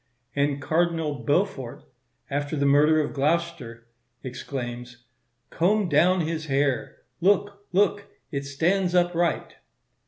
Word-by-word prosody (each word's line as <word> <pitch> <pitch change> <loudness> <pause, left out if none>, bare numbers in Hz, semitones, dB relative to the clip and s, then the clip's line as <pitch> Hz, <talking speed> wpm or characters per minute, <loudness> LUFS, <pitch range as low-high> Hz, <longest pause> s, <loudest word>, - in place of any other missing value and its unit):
And 140 0 +1
Cardinal 165 0 0
Beaufort, 145 -6 -1 0.5
after 145 +2 -2
the 140 -1 0
murder 150 +3 +5
of 145 - -3
Gloucester 145 -6 -1 0.4
exclaims, 120 -2 -6 0.5
"Comb 195 +3 +2
down 175 +5 +4
his 160 -1 -3
hair; 135 -3 -1 0.2
look, 200 +2 +1
look, 200 +2 +2 0.3
it 140 -2 -3
stands 175 +6 +1
upright." 175 -2 +1
155 Hz, 105 wpm, -25 LUFS, 140-175 Hz, 0.5 s, murder